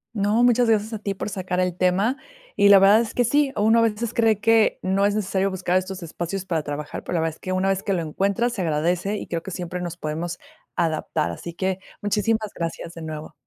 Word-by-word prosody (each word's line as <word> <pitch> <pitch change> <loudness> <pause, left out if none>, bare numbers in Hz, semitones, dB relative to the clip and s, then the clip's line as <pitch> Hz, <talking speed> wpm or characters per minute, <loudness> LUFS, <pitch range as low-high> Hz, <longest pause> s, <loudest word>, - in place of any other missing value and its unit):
No, 210 +3 +2
muchas 245 -1 +4
gracias 220 +1 +1
a 215 - -3
ti 200 -2 -3
por - - -4
sacar 185 -2 -3
el 180 -1 0
tema. 190 +9 +1 0.4
Y 200 0 +5
la 200 - +9
verdad 200 +3 +6
es 230 -1 -5
que 245 - +3
sí, 285 +3 +2
uno 220 +2 +4
a - - +4
veces 225 +1 0
cree 225 -4 +3
que 225 0 +3
no 195 +2 +2
es 205 - -1
necesario 195 -1 0
buscar 180 -1 -1
estos 185 0 -7
espacios 175 +3 -4
para 165 -4 -1
trabajar, 145 0 -5
pero - - -4
la 165 - +1
verdad 160 -1 -1
es - - -25
que 185 - -5
una 185 +1 +1
vez 195 0 0
que 195 - -1
lo 170 - -1
encuentras, 200 +9 0
se 200 - -3
agradece 175 +5 0
y - - -6
creo 165 -1 -3
que 190 - -8
siempre 180 0 -5
nos 175 0 -5
podemos 165 +2 -4 0.4
adaptar. 155 - -1
Así 170 - -7
que, 190 0 -1 0.2
muchísimas 215 +1 0
gracias 165 0 -4
de 165 - -9
nuevo. 155 -1 -7
190 Hz, 235 wpm, -23 LUFS, 175-215 Hz, 0.4 s, la